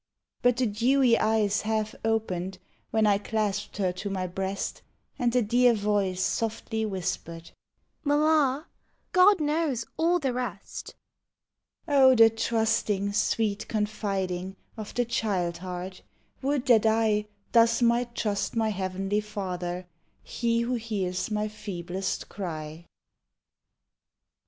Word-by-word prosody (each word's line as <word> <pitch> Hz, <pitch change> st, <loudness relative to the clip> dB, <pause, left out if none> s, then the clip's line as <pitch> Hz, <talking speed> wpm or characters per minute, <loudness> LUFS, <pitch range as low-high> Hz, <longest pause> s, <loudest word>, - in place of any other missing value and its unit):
But 245 Hz, -1 st, +3 dB
the 255 Hz, -, +2 dB
dewy 240 Hz, +3 st, +3 dB
eyes 215 Hz, -2 st, +2 dB
half 215 Hz, 0 st, -1 dB
opened 190 Hz, -5 st, -1 dB, 0.3 s
When 220 Hz, -1 st, +2 dB
I 200 Hz, -1 st, +4 dB
clasped 210 Hz, -1 st, -2 dB
her 190 Hz, -3 st, +1 dB
to 190 Hz, +3 st, -5 dB
my 190 Hz, -2 st, -2 dB
breast, 190 Hz, +2 st, -3 dB, 0.4 s
And 240 Hz, -1 st, +2 dB
the 250 Hz, 0 st, +2 dB
dear 240 Hz, +2 st, +4 dB
voice 200 Hz, -3 st, 0 dB
softly 225 Hz, 0 st, -1 dB
whispered, 170 Hz, -3 st, -4 dB, 0.3 s
" -, -, -47 dB
Mamma, 295 Hz, -1 st, +2 dB, 0.5 s
God 375 Hz, +1 st, +6 dB
knows 300 Hz, -4 st, 0 dB
all 340 Hz, +2 st, +3 dB
the 270 Hz, -7 st, -1 dB
rest." 240 Hz, -7 st, -5 dB, 0.9 s
Oh, 270 Hz, -3 st, +6 dB
the 225 Hz, -1 st, +7 dB
trusting, 220 Hz, -3 st, 0 dB
sweet 210 Hz, 0 st, 0 dB
confiding 195 Hz, -4 st, -2 dB, 0.2 s
Of 215 Hz, -2 st, -7 dB
the 245 Hz, -, +1 dB
child 185 Hz, -7 st, -1 dB
heart! 180 Hz, +1 st, -6 dB, 0.4 s
Would 275 Hz, -1 st, 0 dB
that 230 Hz, -4 st, +5 dB
I 220 Hz, -1 st, +2 dB, 0.2 s
Thus 230 Hz, 0 st, +4 dB
might 235 Hz, 0 st, +2 dB
trust 205 Hz, -1 st, -1 dB
my 225 Hz, -1 st, +1 dB
Heavenly 195 Hz, +1 st, -1 dB
Father, 185 Hz, -4 st, -4 dB, 0.4 s
He 230 Hz, -1 st, 0 dB
who 240 Hz, +2 st, -1 dB
hears 205 Hz, -6 st, -2 dB
my 210 Hz, 0 st, -1 dB
feeblest 190 Hz, -3 st, -4 dB
cry. 160 Hz, -4 st, -6 dB
215 Hz, 125 wpm, -27 LUFS, 195-235 Hz, 0.9 s, the